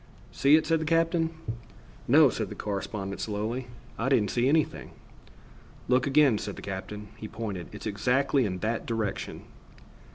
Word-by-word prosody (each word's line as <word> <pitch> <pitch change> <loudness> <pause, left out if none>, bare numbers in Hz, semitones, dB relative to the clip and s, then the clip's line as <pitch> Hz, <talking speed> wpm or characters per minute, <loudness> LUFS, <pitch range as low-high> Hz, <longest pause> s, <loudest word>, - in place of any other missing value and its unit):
"See 140 +2 +5
it?" 155 - +3
said 165 -1 +2
the - - -2
captain. 165 0 +2 0.8
"No," - - +7
said - - -3
the - - -7
correspondent 100 -1 -4
slowly, 110 +4 -3 0.3
"I 120 +4 +1
didn't 105 -7 +3
see 125 +2 +2
anything." 155 +1 0 0.9
"Look 125 +1 +3
again," 140 -6 +4
said 100 - -5
the - - -10
captain. 105 +2 -6
He 110 - -7
pointed. 105 -6 -5
"It's - - -9
exactly 125 +6 +2
in 90 -2 -3
that 110 +1 -2
direction." 110 -4 -3
115 Hz, 155 wpm, -28 LUFS, 105-140 Hz, 0.9 s, No